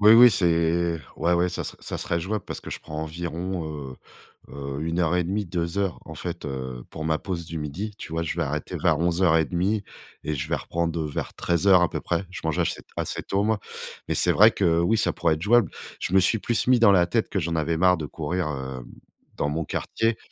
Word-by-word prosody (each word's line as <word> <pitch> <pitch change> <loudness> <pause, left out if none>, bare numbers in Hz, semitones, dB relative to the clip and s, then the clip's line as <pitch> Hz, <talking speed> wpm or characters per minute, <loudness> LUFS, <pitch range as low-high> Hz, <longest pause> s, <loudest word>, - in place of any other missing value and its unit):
oui, 105 +1 +8
oui, 120 +1 +9
c'est 85 -2 +2 0.2
ouais, 85 - +1
ouais, 90 +1 +3
ça 90 - -4
ser - - -6
ça - - -5
serait 85 0 -1
jouable 100 +2 -3
parce - - -6
que - - -9
je - - -5
prends 75 0 -6
environ, 85 +2 -4
heu 70 -4 -6 0.5
heu, 70 0 -5
1 85 +2 -1
heure 85 0 +2
et 90 - +2
1/2- 100 +4 -1
2 85 +1 -2
heures 100 -3 0
en - - -9
fait, 85 -2 -5
heu, 65 -3 -5
pour 80 - -6
ma 80 -1 +2
pause 85 -4 -4
du 85 0 -5
midi, 80 +9 -4
tu - - -8
vois? 85 0 0
Je 80 - -3
vais - - 0
arrêter 75 +2 -3
vers 85 -4 +3
11:30 85 +3 +2 0.4
et 75 - -1
je 65 - -3
vais - - +2
reprendre, 85 -1 -2
heu, 80 - -1
vers 75 - -4
13:00 90 +1 +4
à 90 - +3
peu - - -3
près. 85 +2 -1
Je 90 - -8
mange 80 - 0
achét - - -1
assez - - -3
tôt, 100 +1 0
moi, 110 -1 +1 0.5
mais - - 0
c'est - - +3
vrai 110 +3 +7
que, 85 -5 +2
oui, 110 +6 +3
ça - - +2
pourrait 85 -2 +2
être 80 - -9
jouable. 110 -2 +4 0.3
Je - - -3
me 95 - +7
suis 110 +4 +2
plus 120 +3 0
mis 125 -2 +5
dans 110 -4 +7
la 90 -2 +5
tête 115 +3 0
que 100 - 0
j'en 85 -1 -2
avais 80 +1 0
marre 90 +1 +4
de 80 - -4
courir, 80 +3 -2
hem, 65 -3 -5 0.5
dans 70 - -1
mon 80 +2 -2
quartier. 115 +8 -1
85 Hz, 240 wpm, -25 LUFS, 80-95 Hz, 0.5 s, oui